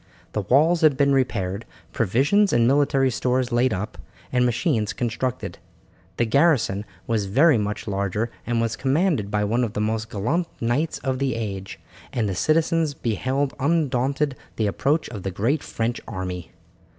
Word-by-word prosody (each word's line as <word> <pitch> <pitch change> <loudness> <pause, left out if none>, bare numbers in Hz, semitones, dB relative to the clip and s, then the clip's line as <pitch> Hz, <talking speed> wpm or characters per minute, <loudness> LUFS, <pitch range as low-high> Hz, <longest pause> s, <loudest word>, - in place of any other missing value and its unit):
The 105 - -1
walls 155 - +3
had 150 -4 +4
been 140 -1 +3
repaired, 110 -6 0 0.3
provisions 140 - +3
and 120 -1 +3
military 135 -1 +3
stores 125 +1 0
laid 120 +2 +3
up, 105 +1 -4 0.3
and 125 -1 +3
machines 120 - 0
constructed. 120 +1 -3 0.6
The 120 - +2
garrison 120 - +2 0.2
was 110 -4 0
very 140 +5 +4
much 105 +1 -3
larger, 100 +3 -1 0.2
and 120 -1 +1
was 115 0 0
commanded 140 - +1
by 105 0 0
one 115 +4 +1
of 110 -3 -2
the - - -2
most 110 +1 -1
gallant 145 - -1
knights 125 +8 0
of 130 -1 -1
the 135 -4 0
age, 100 -4 -5 0.3
and 115 -4 0
the 95 - -1
citizens 155 - +1
beheld 130 - -1
undaunted 140 -2 +1 0.2
the 110 - 0
approach 140 +10 +1
of 110 -4 -7
the 95 - -3
great 115 - 0
French 115 +1 -3
army. 90 -4 -5
120 Hz, 160 wpm, -23 LUFS, 105-140 Hz, 0.6 s, had